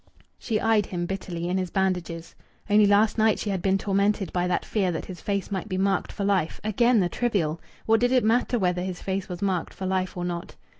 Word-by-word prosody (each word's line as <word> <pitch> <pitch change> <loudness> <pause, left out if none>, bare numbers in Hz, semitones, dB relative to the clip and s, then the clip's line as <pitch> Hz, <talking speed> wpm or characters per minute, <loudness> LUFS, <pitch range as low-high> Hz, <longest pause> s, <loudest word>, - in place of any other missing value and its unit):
She 220 -3 -1
eyed 220 -3 +2
him 175 -1 -3
bitterly 175 -2 -4
in 185 +2 0
his 185 -1 -2
bandages. 180 -3 -2 0.3
Only 210 0 +5
last 210 +2 +3
night 220 0 +4
she 205 - -3
had 190 -2 -2
been 195 +1 +2
tormented 200 -1 0
by 180 0 +1
that 180 - -1
fear 195 -4 0
that 160 - -4
his 185 -2 -9
face 200 -1 -2
might 195 +2 -3
be 185 - -2
marked 195 0 0
for 200 - -4
life. 190 -5 0
Again 235 +3 +3
the 180 - +2
trivial! 175 -8 -1 0.2
What 225 0 +4
did 245 +2 +2
it 255 -1 +4
matter 240 +3 +2
whether 180 -4 0
his 185 -1 -4
face 190 0 -3
was 180 +2 -5
marked 185 -4 -1
for 190 - -5
life 185 -1 -1
or 175 - -2
not?... 175 0 -5
190 Hz, 230 wpm, -25 LUFS, 180-210 Hz, 0.3 s, Only